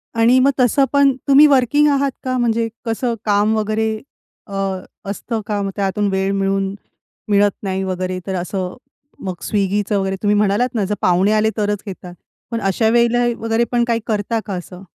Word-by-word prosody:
आणि 235 +3 +4
मग 270 +2 +4
तसं 260 +3 +4
पण, 280 -1 +5 0.2
तुम्ही 280 +2 +7
वर्किंग 285 +2 +3
आहात 280 -1 +1
का? 255 -1 -1
म्हणजे 230 -1 +1 0.2
कसं 235 +2 -1
काम 210 +1 +2
वगैरे 215 +1 0 0.6
अ, 200 - -10 0.6
असतं 220 +2 -3
का? 205 -1 -1
मग 195 - -2
त्यातून 200 +1 0
वेळ 190 0 0
मिळून 195 0 0 0.6
मिळत 205 0 +4
नाही 190 -1 -2
वगैरे, 185 0 -3
तर 190 - -2
असं. 180 +1 -3 0.5
मग 185 -2 -3
Swiggyचं 205 0 0
वगैरे 195 0 -1
तुम्ही 210 0 +2
म्हणालात 210 +5 +1
ना, 210 -4 +1
जर 210 +2 -2
पाहुणे 185 +3 +3
आले, 215 0 +3
तरच 205 -1 -1
घेतात. 180 -2 -8 0.4
पण 230 -1 -2
अशावेळेला 235 +4 +2 0.2
वगैरे 225 +1 +1
पण 240 -1 +2
काही 230 -1 +1
करता 220 +1 -1
का 200 - -5
असं? 180 +1 -8
210 Hz, 170 wpm, -19 LUFS, 195-235 Hz, 0.6 s, तुम्ही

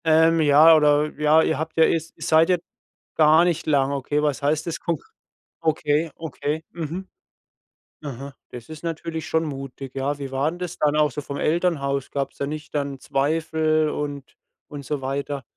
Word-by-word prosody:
Ähm, 160 +1 +4
ja 155 +2 +7
oder 150 0 +3
ja, 155 +1 +5
ihr 160 - 0
habt 160 +1 -5
ja, 160 - +6
ist 165 0 0
seid 160 +1 +4
ihr 180 -1 +3 0.6
gar 155 +1 +6
nicht 170 -2 -1
lang, 140 -2 +2
okay? 140 +2 -1
Was 145 -2 0
heißt 150 +2 0
das 170 0 -3
kon 170 -2 -1 0.6
okay, 155 0 0
okay. 160 0 -4
Mhm. 170 +3 -6 1.0
Aha, 140 -1 -7
das 120 +2 -10
ist 155 0 -10
natürlich 165 -1 -4
schon 160 0 +1
mutig, 135 -2 -7
ja. 140 +2 -2
Wie 140 -1 -5
waren 150 +6 -1
das 180 -1 -5
dann 150 0 +2
auch 150 -1 +3
so 150 - -5
vom 140 0 -6
Elternhaus? 150 -5 0
Gab's 140 -1 -3
dann 140 - -3
nicht 155 0 -7
dann 140 -2 -2
Zweifel 155 +2 0
und 145 -2 -5 0.3
und 145 -2 -9
so 145 0 -3
weiter? 140 +1 -3
150 Hz, 175 wpm, -23 LUFS, 140-160 Hz, 1.0 s, ja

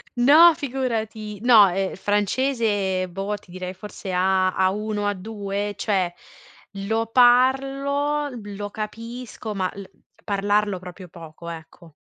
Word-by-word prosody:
No 305 +7 +7
figurati, 225 -6 -3
no, 225 -5 +7
ehm, 190 +1 -2
francese, 205 -2 0
boh, 195 +3 -3
ti 190 -3 -15
direi 185 0 -6
forse 195 0 -8
A 185 +1 +2
A1, 205 +2 0 0.2
A2, 205 -1 -4
cioè 195 -3 0 0.8
lo 225 +1 0
parlo, 275 +4 +3
lo 205 0 -6
capisco, 225 +1 -6
ma 185 -2 -1
l 200 - -8 0.4
parlarlo 205 -1 0
proprio 180 +1 -10
poco, 165 0 -11
ecco. 165 0 -11
205 Hz, 115 wpm, -23 LUFS, 190-240 Hz, 0.8 s, No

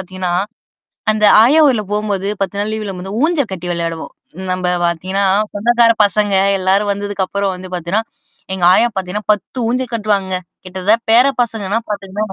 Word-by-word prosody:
பாத்தீங்கன்னா, 185 -1 -4 0.8
அந்த 215 0 -1 0.2
ஆயா 280 +7 +5
ஊர்ல 235 -6 +1
போம்போது 205 -2 -2
10 195 +1 -3
நாள் 210 +1 -2
லீவுல 210 -3 -4
போம்போது 190 +3 -7
ஊஞ்சல் 310 - 0
கட்டி 180 -1 -6
விளையாடுவோம். 165 -1 -4 0.4
நம்ப 185 0 -1 0.2
பாத்தீங்கன்னா, 185 +4 -1 0.3
சொந்தக்கார 235 +2 +3
பசங்க 205 0 0 0.3
எல்லாரும் 200 +2 +2
வந்ததுக்கப்புறம் 200 -1 -2
வந்து 185 0 -10
பாத்தீன்னா, 175 +5 -1 0.5
எங்க 185 -2 -2
ஆயா 240 - +4
பாத்தீங்கன்னா 190 +3 -4
10 210 +5 -5
ஊஞ்சல் 250 0 -2
கட்டுவாங்கங்க. 200 -4 -1 0.3
கிட்டத்தட்ட 190 +4 +1
பேர 240 +4 +6 0.2
பசங்கன்னா 220 -2 -2
பாத்துங்களேன். 200 0 -4
200 Hz, 145 wpm, -16 LUFS, 185-215 Hz, 0.8 s, பேர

